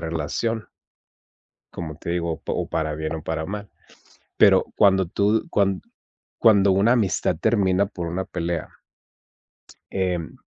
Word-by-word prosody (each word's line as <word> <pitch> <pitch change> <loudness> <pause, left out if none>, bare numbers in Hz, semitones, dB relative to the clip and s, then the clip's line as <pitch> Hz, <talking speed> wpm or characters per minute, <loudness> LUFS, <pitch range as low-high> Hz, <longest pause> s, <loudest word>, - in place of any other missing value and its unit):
relación 85 +8 -2 1.1
como 80 -3 -6
te 85 - -6
digo, 85 -1 -1
o 80 - -8
o - - -2
para 80 -1 -1
bien 80 +1 -3
o 80 - -5
para 80 -1 -3
mal. 105 +1 -6 0.7
Pero, - - +6
cuando 95 -2 +4
tú 105 +5 +1
cuan 100 -2 +1 0.6
cuando 100 -3 +5
una 100 +5 +4
amistad 100 -9 +1
termina 100 -3 +2
por 90 -4 -6
una 90 +3 -3
pelea 85 -2 -3 1.2
em, 90 -4 -2
95 Hz, 130 wpm, -23 LUFS, 80-100 Hz, 1.2 s, Pero